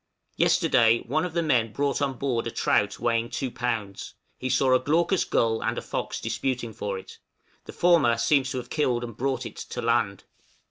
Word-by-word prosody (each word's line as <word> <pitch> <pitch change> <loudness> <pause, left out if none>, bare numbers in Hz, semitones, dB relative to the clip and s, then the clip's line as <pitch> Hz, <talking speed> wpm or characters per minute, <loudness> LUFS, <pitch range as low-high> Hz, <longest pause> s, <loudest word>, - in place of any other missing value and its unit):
Yesterday 115 -2 +3
one 155 +7 0
of 180 - -5
the 170 0 0
men 120 -8 +2
brought 140 +3 -1
on 140 -2 0
board 120 -4 -1
a - - -1
trout 105 -2 +1
weighing 115 0 0
2 130 -2 -3
lbs.; 115 -6 -4 0.3
he 130 - -3
saw 130 0 +3
a 130 - +5
glaucous 170 +7 +1
gull 110 -1 +1
and - - -1
a - - -2
fox - - -4
disputing 125 -4 -3
for 100 -1 -4
it; 95 - -11 0.5
the - - -8
former 160 -10 +3
seems 135 +3 +2
to 130 - -3
have 125 -1 -7
killed 125 -6 0
and 115 -2 -7
brought 130 0 -2
it - - -8
to - - -6
land. 110 -4 0
125 Hz, 195 wpm, -26 LUFS, 115-140 Hz, 0.5 s, a